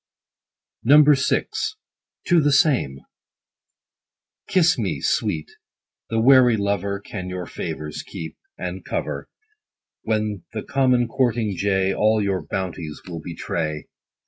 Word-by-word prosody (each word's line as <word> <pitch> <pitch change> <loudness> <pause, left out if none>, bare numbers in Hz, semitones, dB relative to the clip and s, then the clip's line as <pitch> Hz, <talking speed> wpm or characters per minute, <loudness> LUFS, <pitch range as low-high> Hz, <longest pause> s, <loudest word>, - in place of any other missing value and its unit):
VI. 145 +1 +5 0.4
— - - -26
TO 175 -2 +5
THE 145 0 +3
SAME. 130 - +2 1.5
Kiss 175 -3 +4
me, 95 -10 -1
sweet: 75 +3 -1 0.6
the 115 - 0
wary 125 -1 +6
lover 100 -1 -1
Can 95 -2 -7
your 90 -1 -4
favors 75 -3 -5
keep, 80 - -8 0.2
and - - -5
cover, - - -4 0.7
When 105 -4 -1
the 110 - -4
common 130 -3 +2
courting 115 -4 0
jay 95 0 +1
All 110 +1 +3
your 100 -2 0
bounties 85 -5 -5
will 85 -3 -6
betray. 80 -2 -3
100 Hz, 115 wpm, -23 LUFS, 90-125 Hz, 1.5 s, wary